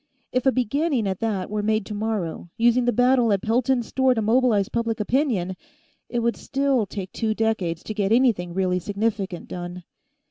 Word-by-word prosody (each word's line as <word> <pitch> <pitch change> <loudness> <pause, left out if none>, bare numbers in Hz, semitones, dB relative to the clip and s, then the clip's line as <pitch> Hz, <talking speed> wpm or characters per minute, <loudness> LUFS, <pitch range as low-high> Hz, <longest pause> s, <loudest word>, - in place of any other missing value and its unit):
If 255 +1 0
a - - +6
beginning 260 0 0
at 190 -1 -2
that 210 -5 -1
were 210 0 -1
made 215 0 0
tomorrow, 210 -6 -3
using 240 +1 +3
the 245 - +3
battle 245 -2 +3
at 195 -2 +1
Pelton's 245 +2 +1
store 260 +1 +2
to 225 - 0
mobilize 225 -3 +3
public 230 -1 -2
opinion, 210 - 0 0.5
it 240 - -1
would 235 0 +1
still 270 -5 0
take 190 -1 -6
two 220 -2 -1
decades 195 -7 -1
to 215 - -5
get 205 -1 -1
anything 225 -8 +3
really 185 -1 +1
significant 200 -2 -2
done. 175 0 -6
220 Hz, 175 wpm, -24 LUFS, 195-245 Hz, 0.5 s, a